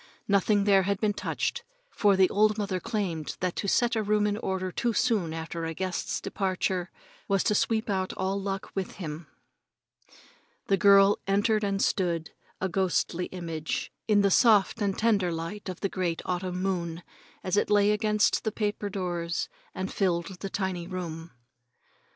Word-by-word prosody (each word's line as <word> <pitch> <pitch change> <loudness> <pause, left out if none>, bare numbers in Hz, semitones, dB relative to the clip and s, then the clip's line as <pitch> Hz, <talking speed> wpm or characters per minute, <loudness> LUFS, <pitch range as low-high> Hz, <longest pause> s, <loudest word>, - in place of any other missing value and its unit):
Nothing 200 +1 +3
there 200 -1 +5
had 200 +1 -1
been 210 -2 +1
touched, - - -2 0.3
for 205 -2 +3
the 190 -1 +5
old 215 +1 +3
mother 195 -3 -1
claimed 180 -8 -3
that 180 -1 -1
to 200 - -2
set 240 +4 +2
a 220 - +1
room 210 0 +2
in 205 -1 +1
order 190 -3 -2
too 235 +6 0
soon 215 -8 +1
after 165 +1 -5
a 165 0 -3
guest's 185 0 -2
departure 185 -2 -1 0.4
was 195 -1 +2
to - - +2
sweep 220 +1 +1
out 190 -2 -1
all 190 +1 -2
luck 195 0 -4
with 195 -2 -3
him. 160 -3 -7 1.4
The 195 - +2
girl 200 0 +6
entered 205 +2 +2
and 200 -1 0
stood, 170 -4 0 0.3
a 190 - 0
ghostly 180 -1 0
image, 165 -4 -4 0.2
in 210 -2 +4
the 200 -1 +3
soft 215 0 +4
and 200 -2 0
tender 205 -6 +2
light 170 +5 -5
of 185 - -7
the 195 - +1
great 180 -3 -2
autumn 180 0 -2
moon 175 -3 -2 0.4
as 185 0 0
it 205 - +2
lay 205 0 +4
against 210 0 +2
the 220 - -1
paper 210 -1 -2
doors 175 -2 -2 0.3
and 190 +1 -4
filled 180 -1 -1
the 195 - -4
tiny 185 -3 -3
room. 170 -3 -5
195 Hz, 170 wpm, -28 LUFS, 180-205 Hz, 1.4 s, girl